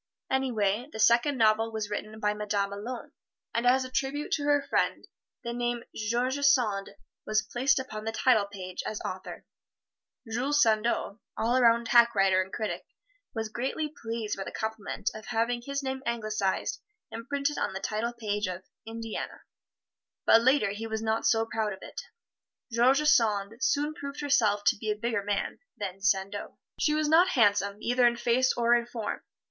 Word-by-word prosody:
Anyway, 245 -2 0
the - - -8
second 240 +6 +4
novel 225 0 +3
was 215 -2 -4
written 215 +1 -5
by 210 -1 +1
the 210 - -10
Madame 205 -1 -1
alone, 230 +4 -6 0.4
and 235 +1 +1
as 260 +1 +4
a 255 - -9
tribute 275 +3 -2
to 295 - +1
her 290 -1 +3
friend - - 0 0.4
the 235 - -3
name 240 0 -2
"George 240 +5 -1
Sand" 245 -8 +2 0.3
was 215 0 +1
placed 270 +3 +1
upon 215 -5 -4
the 225 - -2
title 225 -2 +3
page 185 -2 -6
as 215 - -4
author. 185 0 -6 0.8
Jules 255 +6 0
Sandeau, 220 -3 +2 0.2
all 240 +3 +2
'round 235 -1 +4
hack 235 -1 +6
writer 190 -1 +4
and 190 +1 -6
critic, 215 0 -3 0.5
was 225 -1 -2
greatly 270 +7 -3
pleased 225 -2 -3
by 195 - -3
the - - -7
compliment 220 -2 -3
of 220 0 -9
having 240 +1 0
his 280 +3 -4
name 265 0 -3
anglicized 215 -5 -1 0.3
and 230 +2 -8
printed 285 +1 -1
on - - -1
the 190 - -4
title 215 +4 -2
page 210 -3 -2
of 185 0 -5 0.2
"Indiana," 225 0 -6 0.8
but 225 - +7
later 255 -4 +3
he 220 +3 -5
was 220 0 -3
not 220 0 +1
so 225 -1 +3
proud 220 -2 -2
of 190 - -10
it. - - -7 0.7
George 260 +6 +3
Sand 220 -2 +2
soon 295 +2 +1
proved 280 -1 -7
herself 220 -8 +2
to - - +4
be 215 +1 -4
a 210 - +1
bigger 230 0 -1
man 205 0 -2 0.2
than 195 -2 -5
Sandeau. 195 +1 -1 0.2
She 300 -1 +2
was 310 0 +1
not 330 +4 +6
handsome, 205 -2 +3
either 245 +1 +3
in 235 - +2
face 245 +2 +2
or 235 0 +3
in 235 0 +2
form. 230 -3 -4
230 Hz, 175 wpm, -28 LUFS, 210-255 Hz, 0.8 s, but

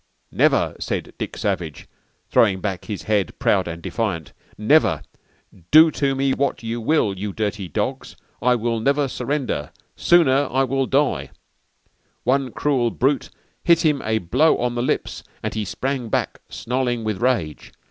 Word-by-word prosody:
'_ - - -17
_"'Never,' - - +3
said - - -4
Dick - - -5
Savage, - - -3 0.4
throwing 95 -4 +4
back 95 -3 -4
his 105 -3 -5
head, 105 -3 0
proud 95 -3 +2
and 85 0 -6
defiant, 90 - -3 0.2
'Never. 145 +10 +3 0.7
Do 155 +1 +8
to 140 -2 0
me 135 0 +1
wot 140 -3 -1
you 115 +1 -3
will, 110 -6 +1
you 105 +1 -3
dirty 105 -1 -3
dogs, 80 - -3 0.3
I 125 0 +4
will 115 0 -1
never 140 +4 +2
surrender. 125 - -3 0.2
Soner 145 -5 +4 0.2
will 135 +1 0
I 140 +2 +1
die.'_ - - -26 1.0
_"One 130 +1 +2
crule 130 -2 0
brute 135 +4 0 0.3
hit 170 -1 +4
him 150 -3 +2
a 110 0 +1
blo 125 - +3
on 120 0 -1
the 120 - -2
lips 125 - -2 0.2
and - - -2
he 110 - -2
sprang 130 +2 -3
back, - - -2
snarling 125 -1 -2
with 110 -1 -3
rage. 95 - -1
120 Hz, 155 wpm, -22 LUFS, 105-140 Hz, 1.0 s, Do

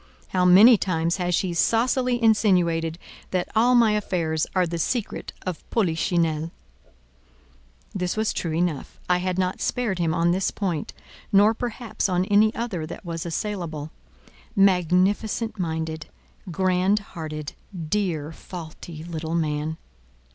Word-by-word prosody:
How 180 -1 +1
many 205 +6 +8
times 170 -2 0
has 180 -1 0
she 180 0 -1
saucily 245 +6 +2
insinuated 180 -8 +2 0.3
that 180 -1 -1
all 240 +3 +4
my 230 -3 +5
affairs 170 -7 0
are 185 -1 +3
the 170 0 -4
secret 230 +5 -2
of 180 -3 -4
Polichinelle!" 165 -5 0 1.4
This 180 +1 -2
was 220 0 +1
true 165 -2 -2
enough: 165 -4 -2
I 180 0 +3
had 185 0 -2
not 185 0 -1
spared 225 -7 -1
him 165 -2 +1
on 170 +1 +2
this 185 +2 +1
point, 175 -7 -3 0.4
nor 205 +2 +5
perhaps 235 -2 -3
on 180 0 +1
any 210 +2 +4
other 200 -9 -3
that 170 - -9
was 165 0 -4
assailable. 165 -4 -4 0.6
Magnificent 195 +4 +2
minded, 160 -2 -3 0.4
grand 185 +3 +2 0.2
hearted, 155 -3 -6 0.3
dear, 165 -6 -1
faulty 160 -1 -9
little 165 -1 -4
man! 155 -1 -1
180 Hz, 130 wpm, -24 LUFS, 165-205 Hz, 1.4 s, many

